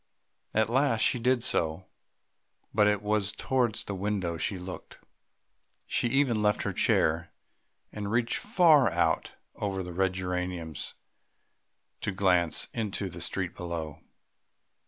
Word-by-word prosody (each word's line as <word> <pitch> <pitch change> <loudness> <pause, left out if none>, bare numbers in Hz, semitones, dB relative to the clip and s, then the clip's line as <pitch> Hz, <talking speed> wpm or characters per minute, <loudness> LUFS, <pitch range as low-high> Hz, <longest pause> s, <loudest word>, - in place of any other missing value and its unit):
At 110 -1 +3
last 125 -1 +2
she 125 - +2
did 125 0 +2
so, 80 +3 0 0.9
but 105 0 +4
it 105 -1 +1
was 105 -1 +1
towards 125 -5 0
the 100 - -5
window 95 -3 -1
she 80 +4 -1
looked. 90 0 -8 0.9
She - - 0
even 125 -3 +2
left 105 0 +2
her - - -2
chair 80 +2 +2 0.6
and 105 -1 -5
reached 115 0 +1
far 165 - +5
out - - 0 0.2
over 95 -2 -2
the 90 -1 -7
red 95 +1 +1
geraniums 90 -3 -4 1.0
to - - -2
glance 90 -4 +2
into 105 -3 -2
the - - -9
street - - -2
below. 85 -4 -5
100 Hz, 130 wpm, -29 LUFS, 90-115 Hz, 1.0 s, far